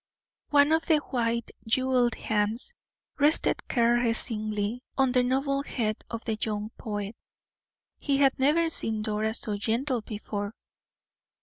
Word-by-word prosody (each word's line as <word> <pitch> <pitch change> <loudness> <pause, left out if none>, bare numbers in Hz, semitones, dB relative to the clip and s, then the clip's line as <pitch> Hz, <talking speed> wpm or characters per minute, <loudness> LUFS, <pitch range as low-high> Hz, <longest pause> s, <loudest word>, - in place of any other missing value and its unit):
One 290 +1 +5
of 320 0 +2
the 315 - +5
white, 235 -5 -2 0.2
jeweled 250 0 +2
hands 220 - 0 0.5
rested 295 +2 +3
caressingly 230 -2 +1 0.2
on 265 -2 +3
the 250 0 +4
noble 275 +2 +1
head 220 -6 -2
of 230 -1 -6
the 220 -2 -2
young 210 0 -3
poet. 205 -1 -5 0.8
He 280 -2 +1
had 275 -1 +3
never 305 +5 +3
seen 220 -9 -1
Dora 215 0 -1
so 210 -3 -1
gentle 235 +4 -1
before. 205 0 -5
235 Hz, 125 wpm, -27 LUFS, 215-270 Hz, 0.8 s, One